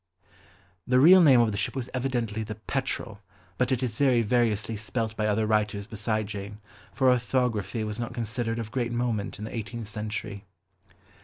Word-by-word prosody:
The 125 0 +4
real 180 +7 +8
name 135 -7 +7
of 115 -2 +2
the 100 - -3
ship - - -1
was 130 -2 -3
evidently 120 -4 -1
the 110 0 -5
Petrel, 115 -2 -3 0.4
but 125 0 +1
it 130 0 +1
is 115 -3 -3
very 130 -4 +4
variously 110 -2 +1
spelt 110 +1 -3
by 110 -1 0
other 110 +1 +1
writers 105 -1 0
beside 110 -1 -2
Jane, 100 0 -7 0.3
for 130 -2 +3
orthography 120 -3 0
was 105 +1 -4
not 120 - -3
considered 115 0 -3
of 110 -2 -5
great 120 -3 -1
moment 120 -4 -2
in 105 - -6
the 110 - -7
eighteenth 115 0 -5
century. 105 -1 -5
115 Hz, 175 wpm, -27 LUFS, 105-125 Hz, 0.4 s, real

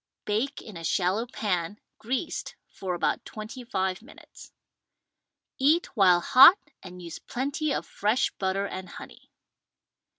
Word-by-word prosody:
Bake 230 +7 -2
in 210 -6 -10
a 165 - -9
shallow 190 +7 0
pan 200 -5 -3 0.2
(greased) 260 +8 -4 0.2
for 185 -2 -4
about 175 - -1
twenty 215 +4 -8
five 190 -5 -2
minutes. 270 +7 -15 1.1
Eat 300 +5 +2
while 180 -5 +5
hot 270 - +8 0.2
and 180 -1 -11
use 170 -2 -8
plenty 285 +4 -3
of - - -2
fresh 215 +5 0
butter 195 +1 -1
and 185 -2 -7
honey. - - -12
210 Hz, 130 wpm, -27 LUFS, 185-255 Hz, 1.1 s, hot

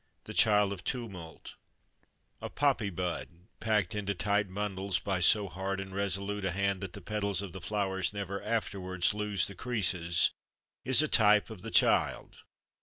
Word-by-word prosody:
THE - - -8
CHILD 105 -2 +4
OF 90 -3 -9
TUMULT 95 -10 -6 0.9
A - - -5
poppy 135 -7 +1
bud, 90 -2 -3 0.3
packed 105 -6 +1
into 100 -1 -2
tight 100 +1 0
bundles 100 -1 -2
by 95 0 -2
so 100 +3 +4
hard 95 +2 -3
and 95 -1 -6
resolute 100 +1 -2
a 95 - 0
hand 100 +1 0
that 95 -3 -6
the 100 - -9
petals 100 -1 -1
of 95 -4 -7
the 95 - -7
flower 95 0 -2
never 100 -1 -4
afterwards 95 -5 -1
lose 105 -3 +1
the 100 - -4
creases, 90 -8 0 0.5
is 130 +3 +4
a - - +1
type 105 -3 +4
of 105 -5 -9
the - - -6
child. - - +2
100 Hz, 165 wpm, -31 LUFS, 95-105 Hz, 0.9 s, CHILD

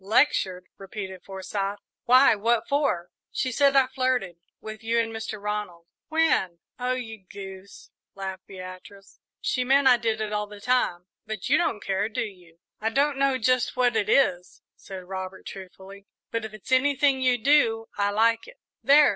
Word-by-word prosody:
"Lectured!" 195 -5 +2
repeated 190 -1 -7
Forsyth. 195 +1 -4 0.3
"Why, 255 +2 +7
what 230 +2 +1
for?" 280 - 0 0.2
"She 255 - -1
said 275 +2 +3
I 270 -1 +6
flirted 255 -9 -1 0.2
with 215 +1 -9
you 230 +1 +1
and 225 -1 -1
Mr. 220 -1 -5
Ronald." 205 -5 -4 0.2
"When?" 315 - +2 0.2
"Oh, 250 +1 0
you 225 -5 -6
goose," 195 -1 -10 0.2
laughed 190 -1 -6
Beatrice. 185 +1 -11 0.2
"She 255 - 0
meant 270 +2 +4
I 250 -2 +7
did 225 -2 -1
it 215 -1 -3
all 210 0 -1
the 205 0 -11
time; 200 -7 0 0.2
but 215 -3 -4
you - - +5
don't 210 - 0
care, 195 +2 0
do 215 - -2
you?" 180 -5 -13 0.2
"I 220 - 0
don't 280 +3 +1
know 275 -1 +3
just 255 +1 +1
what 245 -2 +3
it 215 -1 +1
is," 180 -10 +2
said 190 -2 -9
Robert, 190 0 -7
truthfully; 195 +1 -11 0.2
"but 230 -1 -2
if 220 - -7
it's 215 +5 -12
anything 275 0 +3
you 255 -1 +3
do, 230 -3 +3
I 200 0 +1
like 225 - +2
it." - - -14 0.3
"There!" 285 +4 +7
220 Hz, 170 wpm, -26 LUFS, 195-255 Hz, 0.3 s, Why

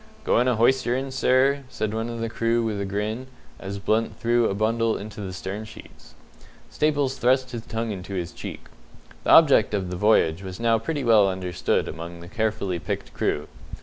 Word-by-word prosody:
"Goin' 125 +2 +2
a 125 - +3
hoysterin', 130 +2 +2
sir?" 130 +2 +3
said 110 -4 -3
one 115 +1 -2
of 115 -1 -5
the 115 - -1
crew, 115 +1 0
with 105 -3 -2
a - - -2
grin, 105 +6 -3 0.3
as 100 +1 -5
Blunt 110 +3 0
threw 120 0 +2
a 95 - -2
bundle 115 +2 +1
into 105 +1 -8
the 95 -2 -5
stern 95 +3 -5
sheets. 110 - -14 0.6
Staples 145 -3 +1
thrust 130 +1 +2
his 120 -2 -5
tongue 115 0 -3
into 95 0 -6
his 90 -1 -3
cheek. - - -8 0.6
The - - -1
object 140 -10 +6
of 95 -3 -3
the - - -3
voyage 90 -4 +3
was 95 0 -7
now 115 -1 +3
pretty 145 +5 -3
well 110 -4 +5
understood 90 -2 -1
among 85 +2 -7
the 85 - -10
carefully 110 -3 -1
picked 80 - -5
crew. 75 - -1
110 Hz, 185 wpm, -24 LUFS, 95-120 Hz, 0.6 s, object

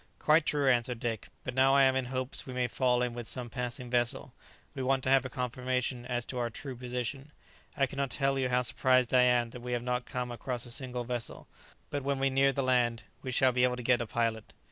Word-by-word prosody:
"Quite 155 +1 +3
true," 145 -2 +1
answered 120 -2 +2
Dick; 115 -3 -3 0.2
"but 130 - -4
now 135 +1 +4
I 140 - +6
am 130 0 +4
in 130 -1 0
hopes 130 +2 -3
we 130 - -6
may 125 -1 +1
fall 125 0 +1
in 125 -1 -2
with 120 -1 -6
some 125 -3 -4
passing 125 +1 -4
vessel; 120 -1 0 0.4
we - - -5
want 135 0 +1
to 130 - +1
have 135 -1 +5
a - - -3
confirmation 125 0 -2
as 120 -1 -2
to 125 - -5
our 120 -1 0
true 130 +3 -7
position. 125 +3 -4 0.5
I 135 - +4
cannot 135 +1 -3
tell 135 +2 0
you 130 -1 0
how 125 0 +2
surprised 130 +1 +2
I 125 - +7
am 120 -2 +3
that 125 - -9
we 125 0 -4
have 120 -1 -1
not 125 0 -2
come 125 -1 -3
across 120 0 -3
a 120 - -6
single 125 -1 -3
vessel. 120 -1 -4 0.4
But 145 - -1
when 140 0 -1
we 135 0 +1
near 135 +1 +4
the 135 0 -1
land 120 -3 +2 0.2
we 130 - -5
shall 130 +1 +3
be 125 0 +1
able 125 0 +3
to 125 - -7
get 120 0 +3
a 120 - -3
pilot." 115 -1 -2
125 Hz, 245 wpm, -30 LUFS, 120-130 Hz, 0.5 s, I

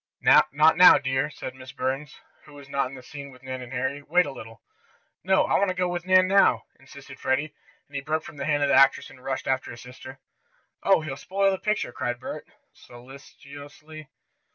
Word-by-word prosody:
"Not - - +5
now, 160 +5 +7
dear," 130 0 -1
said 130 - -8
Miss 130 -1 -12
Burns, 135 +3 -4 0.3
who 150 - -16
was 140 -1 -13
not 140 -1 -1
in 135 - -11
the 130 - -12
scene 140 +1 -10
with 130 -1 -17
Nan 130 -1 -6
and 125 0 -10
Harry. 135 +2 -3
"Wait 180 +5 +2
a - - -6
little." 115 -4 -12 0.6
"No, 190 +1 +3
I - - +1
want 200 - +2
to 185 - -3
go 180 0 0
with 175 0 -5
Nan 185 0 +5
now," 195 +1 +3 0.2
insisted - - -14
Freddie, 140 +3 -1 0.3
and 145 - -16
he 140 - -2
broke 155 +2 -2
from - - -12
the 140 - -4
hand 145 -2 +1
of 140 - +1
the - - +2
actress 135 +1 +4
and 130 -2 -17
rushed 135 -1 -4
after 130 0 -1
his 120 - -10
sister. 130 +2 -12 0.6
"Oh, 195 -4 +3
he'll 145 -3 -6
spoil 195 +4 0
the 190 - -3
picture!" 210 - -2
cried 120 0 -4
Bert, - - -8 0.3
solicitously. 140 +4 -13
140 Hz, 210 wpm, -25 LUFS, 130-160 Hz, 0.6 s, now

